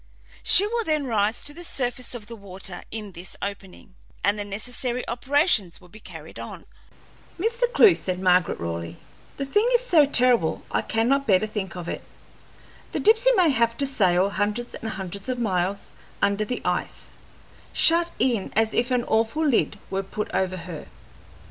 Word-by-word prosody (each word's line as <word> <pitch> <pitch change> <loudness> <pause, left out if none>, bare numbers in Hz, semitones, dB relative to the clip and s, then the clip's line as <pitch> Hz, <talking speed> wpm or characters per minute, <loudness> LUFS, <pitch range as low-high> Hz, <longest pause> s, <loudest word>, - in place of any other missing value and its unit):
She 395 - +6
will 465 +2 -1
then 310 -6 0
rise 220 -2 0
to 290 - -6
the 345 +3 -9
surface 250 -5 -2
of 225 -3 -8
the 230 +2 -9
water 190 -3 -6
in 210 -2 -6
this 180 +1 -9
opening, 200 -1 -7 0.3
and 205 +1 +2
the - - -1
necessary 240 +5 -4
operations 245 - +1
will 180 - -18
be 215 - -14
carried - - -11
on." - - -8 0.7
"Mr. 470 +5 0
Clewe," 440 -5 +7
said 185 - -3
Margaret 180 -1 +2
Raleigh, 85 0 -5 0.4
"the 275 - -2
thing 415 - +2
is - - +3
so 320 - +5
terrible 245 - +2
I - - +1
cannot 265 +5 +1
bear 195 -3 +6
to 215 - -2
think 205 -4 -5
of 175 -2 -6
it. - - -4 0.9
The - - -1
Dipsey 450 +3 +5
may 360 -5 +4
have 235 -3 +1
to 280 - 0
sail 195 -7 +2
hundreds 210 +4 -2
and 225 - -5
hundreds 195 +2 -6
of 255 - -1
miles 195 -3 -1 0.3
under 200 +1 +1
the 250 +4 -4
ice, - - -3 0.5
shut 335 +1 +3
in 235 -7 0
as 220 +1 +2
if 240 +2 +1
an 250 -2 +1
awful 225 +8 +1
lid 245 -6 +2
were 195 0 0
put 195 +2 -5
over 185 -1 0
her. 170 -2 -8
225 Hz, 175 wpm, -24 LUFS, 195-275 Hz, 0.9 s, Clewe